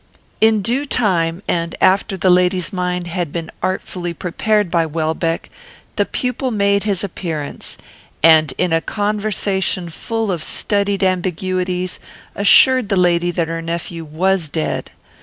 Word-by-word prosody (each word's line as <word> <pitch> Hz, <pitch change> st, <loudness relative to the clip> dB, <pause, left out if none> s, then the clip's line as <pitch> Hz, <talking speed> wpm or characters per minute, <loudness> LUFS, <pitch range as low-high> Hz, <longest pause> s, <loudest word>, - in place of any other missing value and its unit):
"In 220 Hz, -2 st, +4 dB
due 250 Hz, +7 st, 0 dB
time, 180 Hz, -7 st, 0 dB
and 170 Hz, 0 st, -1 dB
after 195 Hz, +1 st, +2 dB
the 185 Hz, -1 st, +3 dB
lady's 180 Hz, 0 st, +2 dB
mind 180 Hz, -1 st, -2 dB
had 175 Hz, -2 st, -3 dB
been 165 Hz, 0 st, -5 dB
artfully 180 Hz, -2 st, -3 dB
prepared 205 Hz, +2 st, 0 dB
by 170 Hz, -2 st, +3 dB
Welbeck, 160 Hz, +1 st, -2 dB, 0.4 s
the -, -, +1 dB
pupil 250 Hz, +1 st, -2 dB
made 200 Hz, -2 st, +1 dB
his 200 Hz, -3 st, +1 dB
appearance; 165 Hz, -6 st, -5 dB, 0.5 s
and, 155 Hz, -3 st, +6 dB
in 180 Hz, -2 st, +1 dB
a 165 Hz, -, +2 dB
conversation 205 Hz, -3 st, -1 dB
full 225 Hz, +5 st, -2 dB
of 170 Hz, -3 st, -2 dB
studied 200 Hz, +1 st, +1 dB
ambiguities, 185 Hz, 0 st, -1 dB, 0.3 s
assured 245 Hz, +3 st, +5 dB
the 200 Hz, -, +1 dB
lady 175 Hz, -1 st, +2 dB
that 170 Hz, -1 st, -1 dB
her 165 Hz, 0 st, -4 dB
nephew 165 Hz, 0 st, -4 dB
was 165 Hz, +2 st, 0 dB
dead. 155 Hz, +1 st, -2 dB
180 Hz, 140 wpm, -18 LUFS, 170-200 Hz, 0.5 s, and